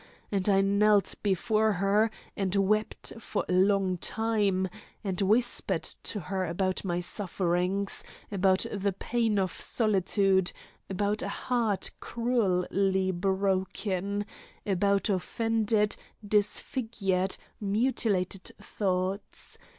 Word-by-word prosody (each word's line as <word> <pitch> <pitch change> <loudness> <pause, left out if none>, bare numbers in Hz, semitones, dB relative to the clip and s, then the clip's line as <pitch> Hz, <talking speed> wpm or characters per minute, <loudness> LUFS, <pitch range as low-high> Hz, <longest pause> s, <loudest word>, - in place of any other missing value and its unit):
And 200 0 +1
I 195 -1 +5
knelt 200 +1 +3
before 215 +2 +2
her 200 +4 +2 0.3
and 195 -1 -1
wept 210 +2 0
for - - -3
a - - -1
long 190 -1 +2
time, 205 -3 +1 0.4
and 190 -3 -2
whispered 225 +5 +3
to 210 - -2
her 190 +1 -2
about 185 +2 -1
my 175 -2 -1
sufferings, 185 +1 -1 0.3
about 190 -1 +2
the 200 -1 -1
pain 225 +2 0
of 190 -2 +1
solitude, 195 -3 +1 0.4
about 205 +3 -1
a - - -3
heart 235 -6 -1
cruelly 195 -5 0
broken, 190 +1 -1 0.4
about 200 0 +1
offended, 215 +1 +1 0.3
disfigured, 205 -2 0 0.2
mutilated 205 -3 0
thoughts. 190 0 -3
195 Hz, 100 wpm, -28 LUFS, 190-215 Hz, 0.4 s, I